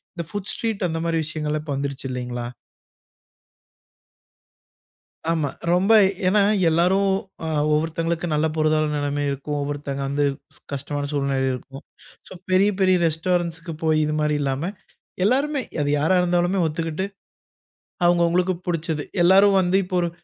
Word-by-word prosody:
இந்த 170 - -3
food 205 -1 -4
street 215 -5 -2
அந்த 165 - -2
மாதிரி 165 -1 +1
விஷயங்கள்லாம் 150 -1 -3
இப்போ 145 - -2
வந்துடுச்சு 140 0 -4
இல்லிங்களா! 125 -1 -4 2.9
ஆமா, 160 -4 0 0.2
ரொம்ப. 190 +5 +3 0.4
ஏனா, 205 +2 +4 0.3
எல்லாரும் 185 +4 +3 0.3
அ 160 - -2 0.2
ஒவ்வொருத்தவங்களுக்கும் 165 +2 -1
நல்ல 150 +1 +2
பொருளாதார 155 0 +2
நிலைமை 145 0 -1
இருக்கும், 140 +2 -4
ஒவ்வொருத்தவங்க 140 -1 -4
வந்து 145 +1 0 0.5
கஷ்டமான 145 +1 -3
சூழ்நிலை 140 -1 0
இருக்கும், 135 +3 -8 0.5
சோ - - -12 0.2
பெரிய 195 +3 +5
பெரிய 185 -1 +4
ரெஸ்டாரண்ட்ஸ்க்கு 170 0 -1
போய், 155 -1 +2
இது 150 - -1
மாதிரி 150 0 +1
இல்லாம, 140 +6 -1 0.6
எல்லோருமே 275 +5 +1 0.2
அது 145 - -1
யாரா 160 +6 +3
இருந்தாலுமே 180 +2 +1
ஒத்துக்கிட்டு, 165 +3 -3 1.0
அவங்க 175 0 +4
அவங்களுக்கு 180 +2 +1
பிடிச்சது, 160 -3 -2 0.2
எல்லாரும் 195 +2 +6
வந்து 185 +1 +2
இப்போ 185 - -2
ஒரு 170 - -1
160 Hz, 130 wpm, -23 LUFS, 145-180 Hz, 2.9 s, எல்லாரும்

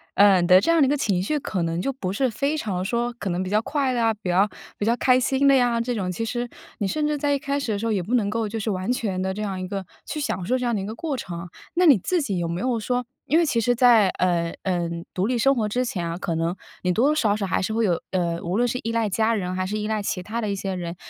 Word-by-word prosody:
呃， 200 -2 +6
你 175 - +1
的 185 +1 +8
这 335 - +2
样 325 -3 +5
一 - - +4
个 290 - +2
情 195 -9 +1
绪 300 +10 0
可 190 -9 -3
能 165 0 -1
就 275 - -1
不 190 -8 -4
是 260 +5 +1
非 280 +7 -1
常 185 -9 -2
说 240 +4 -1
可 195 - -3
能 175 +1 -1
比 185 - -4
较 210 +1 +3
快 275 0 0
乐 240 - 0
啊， 225 - +3
比 200 -3 -6
较 195 +4 +3 0.3
比 205 - -2
较 230 +2 +3
开 255 0 +4
心 265 +2 +2
的 275 - +7
呀 245 -2 +3
这 240 +1 -1
种。 190 -5 -2
其 225 +6 -3
实， 240 +1 -3 0.3
你 200 - 0
甚 300 +8 0
至 300 0 0
在 285 0 +1
一 280 - 0
开 280 0 -1
始 240 -5 -2
的 205 - 0
时 225 - -3
候， 225 - +1
也 200 -3 +1
不 225 +8 -1
能 205 -4 +1
够 225 +1 -1
就 225 +1 -4
是 215 +1 -1
完 185 +4 -2
全 200 -7 -1
地 190 0 -1
这 210 - -4
样 190 -2 -3
一 185 - -4
个 195 0 -4 0.2
去 305 - -4
享 190 -10 -2
受 255 +7 +1
这 250 - -2
样 235 - +1
的 200 - -1
一 - - -4
个 215 +2 -5
过 295 +2 -3
程。 175 -7 -6 0.3
那 360 +1 +4
你 290 -8 +7
自 360 - 0
己 200 -9 -2
有 170 - -1
没 170 +2 -3
有 250 -1 0
说， 245 +2 -1 0.2
因 315 - +3
为 340 - +3
其 240 -6 +1
实 245 +2 +2
在， 235 -5 +5
呃， 170 -2 +1
呃， 175 -3 0 0.3
独 185 - +1
立 250 -1 0
生 270 +3 +4
活 220 -3 0
之 250 +4 0
前 175 -8 -3
啊， 165 +1 -3
可 170 - -2
能 165 +2 -1 0.3
你 180 - +2
多 230 +9 +3
多 305 - +2
少 215 -8 +2
少 205 -2 -2
还 - - 0
是 220 - -1
会 230 +1 +1
有， 175 -4 +1
呃， 170 -2 0
无 175 +3 -1
论 245 +1 +3
是 250 - -2
依 230 - -2
赖 230 -2 0
家 220 +3 +1
人， 185 -3 -2
还 185 0 -1
是 210 +3 -2
依 210 - -2
赖 215 -1 -1
其 185 -2 -2
他 225 +5 -4
的 215 - -2
一 200 - -1
些 195 -1 -3
人。 175 -1 -5
215 Hz, 340 characters per minute, -24 LUFS, 185-250 Hz, 0.3 s, 的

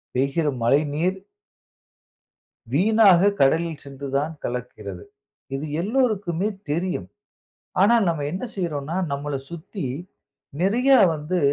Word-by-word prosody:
பெய்கிற 140 +5 +1 0.2
மழைநீர் 150 +8 +2 1.6
வீணாக 200 +2 +5
கடலில் 160 +3 +2
சென்று 140 0 -7
தான் 150 +3 -1
கலக்கிறது. 110 -6 -5 0.5
இது 140 +3 -3 0.2
எல்லோருக்குமே 205 -5 0 0.2
தெரியும். 170 - -2 0.7
ஆனால், 225 +3 +5
நம்ம 160 -4 -1
என்ன 185 +6 -3
செய்றோன்னா, 160 -2 -3 0.2
நம்மள 140 +1 -3 0.2
சுத்தி, 170 0 -6 0.7
நிறைய 235 +9 +2 0.2
வந்து 155 +4 -2
165 Hz, 95 wpm, -23 LUFS, 140-190 Hz, 1.6 s, வீணாக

